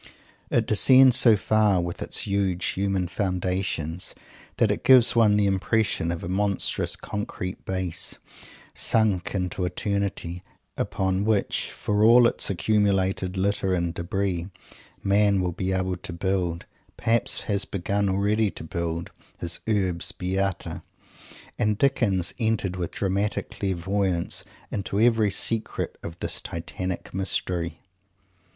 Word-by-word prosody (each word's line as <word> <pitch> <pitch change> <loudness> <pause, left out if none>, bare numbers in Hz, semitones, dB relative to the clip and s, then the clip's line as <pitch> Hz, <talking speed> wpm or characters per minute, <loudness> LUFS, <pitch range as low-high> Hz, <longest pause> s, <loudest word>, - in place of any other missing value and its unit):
It - - +2
descends 130 +4 +6
so 115 -5 +6
far, 105 -2 +2
with 85 0 -4
its - - 0
huge 100 -3 0
human 95 -2 -1
foundations, 90 -2 -2 0.4
that - - +3
it - - -3
gives 125 -3 +6
one 110 -3 +4
the 105 - +3
impression 100 -2 0
of 85 - -5
a - - -4
monstrous 100 +2 0
concrete 105 -3 -5
Base, 95 -3 -1 0.6
sunk 105 -5 +1
into 90 0 -2
eternity, 90 -2 -2 0.3
upon 95 0 -1
which, 105 -2 0
for 105 0 -1
all 120 +2 +7
its - - +1
accumulated 95 -1 +1
litter 95 0 +1
and 85 -1 -1
debris, 90 0 -2 0.6
man 100 0 +3
will 90 -1 0
be 95 +2 -3
able 95 -1 -1
to 90 -1 -7
build, 90 -1 -2 0.3
perhaps 115 +1 +1
has 100 -1 0
begun 100 +1 -1
already, 100 +3 +1
to - - -8
build, 85 +1 -4 0.3
his 85 0 0
Urbs 95 -5 +2
Beata. 95 0 -2 0.8
And 105 -1 +1
Dickens 100 -9 +2
entered 110 -5 0
with 90 -2 -3
dramatic 100 +1 -2
clairvoyance 95 -1 -1 0.3
into 100 0 -2
every 115 -2 +4
secret 110 +3 -2
of 85 +1 -8
this - - -3
Titanic 90 +2 -5
mystery. 90 -2 -2
95 Hz, 125 wpm, -25 LUFS, 90-105 Hz, 0.8 s, all